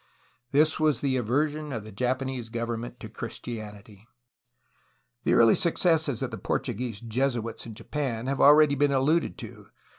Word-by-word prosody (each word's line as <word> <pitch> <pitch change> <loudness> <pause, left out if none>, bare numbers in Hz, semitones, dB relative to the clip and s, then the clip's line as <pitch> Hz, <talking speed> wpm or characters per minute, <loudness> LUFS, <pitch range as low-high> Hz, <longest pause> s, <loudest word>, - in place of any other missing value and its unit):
This 155 +3 +3
was 150 -5 +2
the 135 -2 +1
aversion 145 +5 -1
of 115 -5 -4
the 110 - -10
Japanese 130 +2 -2
government 115 0 -4
for - - -7
Christianity. 105 -2 -8 1.2
The - - +3
early 115 -1 +6
successes 160 -7 +1
of 130 - -3
the 115 - -6
Portuguese 115 +2 -3
Jesuits 115 -1 -2
in 110 - -9
Japan 125 -2 -3
have 135 +1 -1
already 150 0 +7
been 145 0 +2
alluded 145 +5 +1
to. - - -10
130 Hz, 145 wpm, -27 LUFS, 115-145 Hz, 1.2 s, already